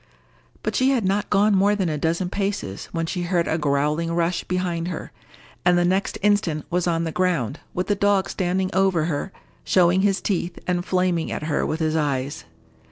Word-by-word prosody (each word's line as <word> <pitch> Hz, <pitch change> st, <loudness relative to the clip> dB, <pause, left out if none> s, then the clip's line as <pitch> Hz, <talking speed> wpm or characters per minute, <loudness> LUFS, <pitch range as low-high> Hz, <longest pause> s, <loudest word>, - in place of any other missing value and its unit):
But -, -, -2 dB
she 260 Hz, +1 st, +3 dB
had 250 Hz, -7 st, +1 dB
not 200 Hz, +2 st, 0 dB
gone 205 Hz, +1 st, +4 dB
more 200 Hz, +2 st, +4 dB
than 190 Hz, -3 st, 0 dB
a 155 Hz, -, -1 dB
dozen 170 Hz, +4 st, -1 dB
paces, 195 Hz, -, -3 dB
when 165 Hz, 0 st, -1 dB
she 180 Hz, +2 st, -3 dB
heard 175 Hz, -1 st, 0 dB
a 160 Hz, -, 0 dB
growling 150 Hz, +3 st, 0 dB
rush 170 Hz, +1 st, 0 dB
behind 175 Hz, -2 st, -2 dB
her, 180 Hz, -, -5 dB, 0.5 s
and 175 Hz, 0 st, +4 dB
the 175 Hz, -, +3 dB
next 190 Hz, +3 st, 0 dB
instant 195 Hz, -7 st, +1 dB
was 180 Hz, 0 st, +1 dB
on 165 Hz, -1 st, +1 dB
the 165 Hz, -, -2 dB
ground, 165 Hz, -8 st, 0 dB, 0.2 s
with 180 Hz, -, 0 dB
the 205 Hz, -, +1 dB
dog 200 Hz, -1 st, +2 dB
standing 185 Hz, 0 st, -1 dB
over 190 Hz, -4 st, +2 dB
her, 165 Hz, +3 st, -2 dB, 0.3 s
showing 180 Hz, 0 st, +3 dB
his 195 Hz, -1 st, +2 dB
teeth, 180 Hz, -3 st, -2 dB
and 180 Hz, 0 st, -1 dB
flaming 180 Hz, -3 st, 0 dB
at -, -, -4 dB
her 150 Hz, -1 st, 0 dB
with 160 Hz, +1 st, -2 dB
his 155 Hz, 0 st, +1 dB
eyes. 140 Hz, -2 st, -1 dB
175 Hz, 195 wpm, -23 LUFS, 165-190 Hz, 0.5 s, gone